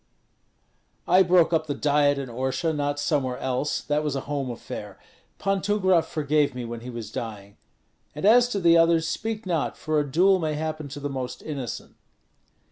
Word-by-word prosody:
"I 185 - +6
broke 175 -2 +4
up 160 -1 +1
the 145 - -2
Diet 145 -1 +2
in 135 -1 -4
Orsha, 130 +6 -1
not 145 0 -1
somewhere 135 -4 0
else; 130 +3 -1
that 150 +1 -1
was 150 -2 -2
a 135 - -2
home 140 -2 -3
affair. 120 - -7 0.4
Pan 195 -1 0
Tumgrat 190 -4 +2
forgave 150 -2 0
me 125 -1 -4
when 115 0 -6
he 120 +2 -9
was 115 -2 -7
dying; 100 -3 -7 0.6
and 150 - -3
as 240 +3 +6
to 210 -5 -2
the 170 -2 +5
others, 165 -1 +3
speak 220 +2 -3
not, 170 -5 -1
for 155 -1 0
a 145 -2 -2
duel 185 +5 +4
may 155 -3 -1
happen 155 -1 -4
to 140 +1 -8
the 145 - -3
most 130 -3 -5
innocent." 140 -6 -6
150 Hz, 185 wpm, -25 LUFS, 130-170 Hz, 0.6 s, I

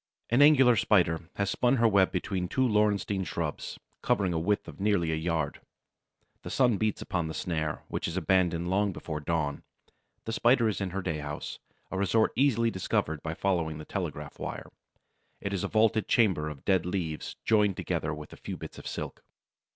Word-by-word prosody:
An 120 +4 +5
Angular 135 -5 +7
Spider 85 -6 +2
has 100 0 0
spun 125 +1 +2
her 115 -2 +4
web 100 -3 +4
between 90 0 -2
two 130 +7 +1
laurestine 105 -3 +1
shrubs, 85 - -4 0.2
covering 95 -3 +1
a 80 - 0
width 100 +5 0
of - - -10
nearly 100 -5 +2
a - - +1
yard. 80 -3 -2 0.8
The - - -7
sun 125 -5 +3
beats 110 0 -1
upon 85 -3 -2
the 80 - -5
snare, 80 -3 -2
which - - -3
is 85 - -4
abandoned 90 -2 +1
long 100 0 +2
before 80 -2 -5
dawn. 75 -2 -1 0.6
The 115 - -3
Spider 120 0 +4
is 105 -1 -1
in 95 - -1
her 95 +2 -4
day 80 -4 -2
house, 75 0 -6 0.3
a 95 - -2
resort 105 +3 +2
easily 115 -4 +3
discovered 80 -5 -1
by 80 0 -4
following 85 -6 0
the 75 - -8
telegraph 75 -7 -5
wire. - - -6 0.7
It 100 - -4
is 95 - -1
a - - 0
vaulted 110 0 +2
chamber 95 -10 +2
of 75 -3 -10
dead 95 -3 +3
leaves, 85 -4 -3
joined 105 -4 +3
together 75 - -2
with 75 -1 -8
a - - -11
few - - -6
bits - - -9
of - - -9
silk. - - -5
95 Hz, 190 wpm, -29 LUFS, 80-105 Hz, 0.8 s, Angular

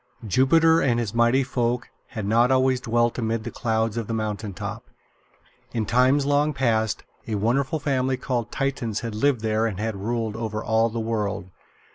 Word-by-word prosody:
Jupiter 160 - +4
and 120 -3 +2
his 115 -4 -3
Mighty 120 +3 +3
Folk 125 -1 -1 0.2
had 110 -6 -5
not 115 +4 +3
always 130 -1 +2
dwelt 120 +1 +1
amid 115 -1 -1
the 120 - -5
clouds 110 -1 -1
on 115 - -5
the 115 - -2
mountain 105 -1 -3
top. 90 - -6 0.9
In 110 -2 -1
times 130 +5 +3
long 145 +1 +2
past, 110 -5 0 0.2
a 110 - -2
wonderful 130 +8 +1
family 130 -2 0
called 125 -3 -2
Titans 130 -6 -2
had 115 -2 -4
lived 125 +2 +1
there 110 0 +1
and 100 -4 -5
had 110 0 -2
ruled 110 +2 -2
over 110 -1 -3
all 115 0 +2
the 115 +1 -4
world. 105 -4 -2
115 Hz, 175 wpm, -24 LUFS, 110-130 Hz, 0.9 s, Jupiter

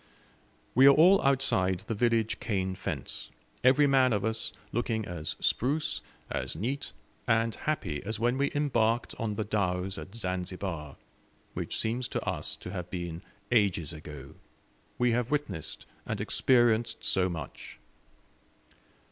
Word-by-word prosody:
We 130 +3 +7
are 140 - +8
all 180 +5 +7
outside 95 -10 +2
the 115 - -4
village 115 0 +1
cane 95 -5 -1
fence, - - -4 0.3
every 130 +3 +6
man 135 -3 +4
of 100 0 0
us 110 0 -1 0.2
looking 115 -2 -1
as 85 -4 -4
spruce, 145 +6 0 0.3
as - - -3
neat, 125 - -3 0.4
and 115 -1 +3
happy 100 - -2
as 110 +2 -2
when 120 +2 +2
we 140 - +2
embarked 120 -5 +1
on 110 -2 -1
the 110 - -1
dhows 95 -2 -1
at 95 - -9
Zanzibar, 90 -6 -3 0.6
which - - -3
seems 120 +3 0
to - - -3
us - - -1
to 90 - -8
have 90 -2 -5
been 85 -2 -4 0.3
ages 95 -9 +2
ago 75 -3 -9 0.6
we 125 -1 +3
have 120 +1 0
witnessed 125 - -3 0.2
and - - -2
experienced 120 -2 +2
so 95 -1 +2
much. 80 -5 -7
110 Hz, 140 wpm, -29 LUFS, 90-125 Hz, 0.6 s, are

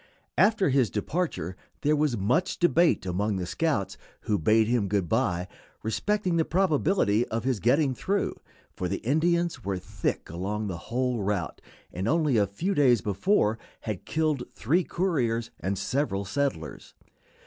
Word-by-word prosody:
After 200 -1 +4
his 130 -5 +3
departure 105 - -2 0.3
there 150 +1 +3
was 145 -5 +1
much 125 - +1
debate 170 - +3
among 100 +3 -1
the 90 -1 -2
scouts 125 - -1 0.2
who 105 -2 0
bade 110 +7 +4
him 115 -4 +1
good 100 -3 0
by 90 -5 0 0.4
respecting 185 - 0
the 165 - +3
probability 160 - +2
of 115 0 -3
his 130 -4 0
getting 135 - +3
through, 200 +10 -1 0.4
for 90 - -3
the 95 - -2
Indians 165 0 +1
were 100 -1 -2
thick 90 - -3
along 100 +5 -3
the 95 -4 -3
whole 125 -1 0
route, 100 -3 -2 0.3
and 95 +3 -3
only 155 -3 +2
a 100 -2 +3
few 170 - -2
days 125 - +4
before 105 - +1 0.2
had 105 -5 -5
killed 155 -5 0
three 165 +10 +1
couriers 120 -13 -1
and 95 +1 -2
several 100 -2 -1
settlers. 100 - -3
120 Hz, 150 wpm, -27 LUFS, 100-160 Hz, 0.4 s, After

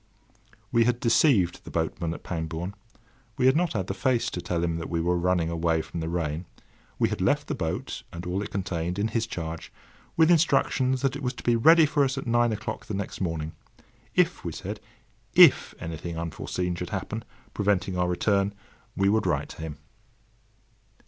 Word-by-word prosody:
We 115 -1 +4
had 120 0 +1
deceived 115 - +3
the - - -10
boatman 80 0 -2
at - - -11
Pangbourne. 85 +2 -4 0.6
We - - +2
had 130 +1 +6
not 170 -1 +1
had 95 -5 -1
the 95 - -3
face 120 +4 +1
to 90 - -4
tell 85 -1 -1
him 85 -1 0
that 85 - -5
we 85 - -1
were 90 +2 +1
running 90 -1 +1
away 80 -1 +1
from 85 - -6
the 80 0 -3
rain. 85 0 -2 0.5
We - - +2
had - - -3
left - - +2
the - - -3
boat, - - -3
and 85 +1 -7
all 90 +2 -1
it 105 - -5
contained, 90 -2 -2
in 105 +2 0
his 115 0 -1
charge, 80 -5 -5 0.5
with 160 +1 +6
instructions 135 -5 +2
that 135 0 +1
it 145 - -5
was 125 -1 -1
to - - -10
be 120 - +3
ready 160 +7 +7
for 145 -1 +2
us 135 0 0
at 135 - -4
nine 120 0 +3
the 105 -1 -4
next 100 0 -5
morning. 80 -3 -2 0.6
If, - - +2
we - - -4
said—if - - +2
anything 80 +1 -5
unforeseen 90 +2 -3
should 90 0 -5
happen, 110 +3 -4 0.3
preventing 95 -2 0
our 90 0 +1
return, 100 +2 +1 0.4
we 100 - +3
would 110 +2 +2
write - - 0
to - - -10
him. 80 -2 -6
95 Hz, 190 wpm, -27 LUFS, 85-115 Hz, 0.6 s, ready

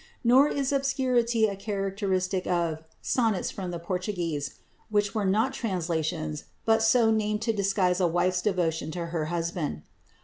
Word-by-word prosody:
Nor 255 +4 +6
is 280 -2 -1
obscurity 250 -4 +2
a 200 -2 -1
characteristic 195 -2 -1
of 170 -3 0 0.2
"Sonnets 225 -6 +1
from 190 -2 -5
the 175 - -3
Portuguese," 170 -4 -3 0.3
which 205 -1 +1
were 210 -3 0
not 220 +7 +2
translations, 160 - -2 0.2
but 225 0 +4
so 225 0 +4
named 215 -1 0
to 225 - +1
disguise 195 -3 +1
a 180 - +3
wife's 180 +2 +1
devotion 175 -6 0
to 170 -1 -3
her 160 -3 0
husband. 165 - -3
195 Hz, 145 wpm, -27 LUFS, 175-220 Hz, 0.3 s, Nor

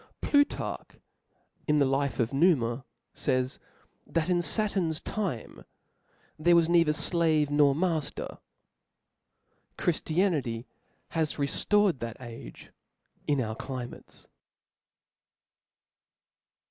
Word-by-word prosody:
Plutarch, 285 0 0 0.7
^in 150 -1 +3
the 140 - +4
life 135 +1 0
of 115 +2 0
Numa, 135 -6 +2 0.3
fays, 130 0 0 0.5
that 165 +1 -1
in 175 -1 +3
Sa 175 +7 +1
turn's 170 -7 -1
time, 190 - -4 0.8
there 170 +2 +5
was 170 -1 +5
neither 170 -2 +4
flave 155 -2 +2
nor 145 -1 +4
matter. 160 -3 -2 1.4
Chridianrty 155 - 0 0.4
has 160 -2 -1
rcfl:ored 185 +4 +2
that 115 -1 -5
age 115 - -10 0.6
in 145 -2 +2
our 110 -3 -2
climates. 125 -1 -8
150 Hz, 95 wpm, -28 LUFS, 130-170 Hz, 1.4 s, there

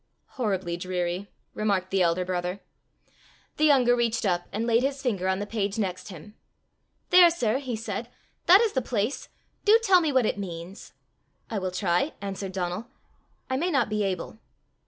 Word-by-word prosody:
"Horribly 190 -8 -2
dreary," 180 +1 -3 0.2
remarked 195 -3 -1
the 195 -1 +2
elder 175 +1 +2
brother. 180 +1 -3 1.0
The 310 - +3
younger 255 -5 +5
reached 230 -2 0
up, 175 -2 0
and 220 +3 -2
laid 230 0 +3
his 275 +1 -1
finger 200 -8 -1
on 190 0 +1
the 205 - -3
page 205 -1 -2
next 185 -4 -3
him. 190 +3 -11 0.8
"There, 355 -1 +8
sir!" 255 -7 0
he 260 -4 -4
said; 220 +1 -5 0.4
"that 375 +5 +8
is 455 -3 +1
the 260 - +1
place: 230 +1 -2 0.3
do 430 +2 +7
tell 380 -4 +5
me 315 -3 0
what 260 -4 +3
it 205 - -1
means." 175 0 -8 0.6
"I 215 - -1
will 185 -1 -2
try," 180 - 0
answered 195 -1 -5
Donal; 180 +4 -3 0.6
"I 260 - -1
may 345 +6 0
not 280 -9 +1
be 210 0 -1
able." 195 +2 -3
205 Hz, 175 wpm, -26 LUFS, 185-255 Hz, 1.0 s, There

